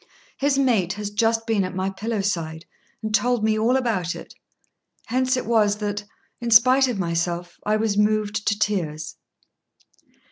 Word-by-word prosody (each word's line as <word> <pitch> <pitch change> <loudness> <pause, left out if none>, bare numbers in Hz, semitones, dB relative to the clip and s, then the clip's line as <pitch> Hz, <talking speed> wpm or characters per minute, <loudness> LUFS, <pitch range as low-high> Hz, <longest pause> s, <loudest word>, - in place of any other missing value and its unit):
His 280 0 +2
mate 225 -10 +2
has 205 0 -5
just 225 +2 +1
been 220 -3 +1
at 185 0 -5
my 190 +1 -1
pillow 215 +2 -3
side 165 -5 -3 0.4
and 215 0 -3
told 245 +1 +2
me 215 0 +2
all 240 +4 +3
about 205 -9 -1
it; - - -10 0.7
hence 255 +2 +1
it - - -3
was 210 -2 +2
that, 205 -1 -3 0.3
in 235 - -3
spite 255 +4 +6
of 245 -5 -2
myself, 175 0 -2
I 210 - +3
was 215 -1 0
moved 210 0 0
to 205 - +2
tears." 160 -8 -2
210 Hz, 165 wpm, -23 LUFS, 190-230 Hz, 0.7 s, spite